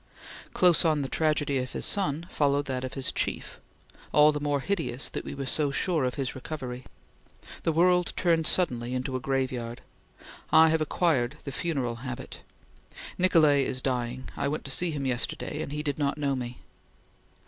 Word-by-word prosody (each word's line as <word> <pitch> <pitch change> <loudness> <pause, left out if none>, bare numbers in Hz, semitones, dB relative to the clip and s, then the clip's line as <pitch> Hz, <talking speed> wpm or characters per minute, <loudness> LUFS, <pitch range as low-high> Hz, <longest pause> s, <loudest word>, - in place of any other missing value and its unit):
Close 175 -3 +5
on 155 -4 +2
the - - -2
tragedy 145 -2 +1
of 125 0 -4
his - - -2
son, 165 -5 0
followed 145 -3 +1
that 130 -2 -3
of 130 - -5
his 135 -1 -1
chief, - - -3 0.5
"all 150 +1 +6
the 150 - -3
more 145 -1 0
hideous 160 -6 -1
that - - -5
we - - -6
were 140 0 -4
so 145 +3 0
sure 155 0 0
of 125 - -2
his 135 -2 -2
recovery." 130 -3 -6 0.8
The 165 - +1
world 180 +2 +3
turned 165 -3 +2
suddenly 125 -8 +1
into 130 +1 -3
a - - 0
graveyard. 130 -3 -2 0.7
"I 160 0 +7
have 160 0 +1
acquired 155 -4 +1
the 140 - -5
funeral 135 -7 -2
habit." 130 +1 -7 0.8
"Nicolay 155 -6 +5
is 130 - +1
dying. 125 -1 -2
I - - -1
went 150 +2 -3
to 140 - +3
see 175 +6 +2
him 145 -4 -3
yesterday, 125 -2 -2
and - - -5
he 150 +1 -3
did 145 0 -2
not 140 0 0
know 140 -2 0
me." 125 -1 -6
140 Hz, 180 wpm, -28 LUFS, 130-155 Hz, 0.8 s, I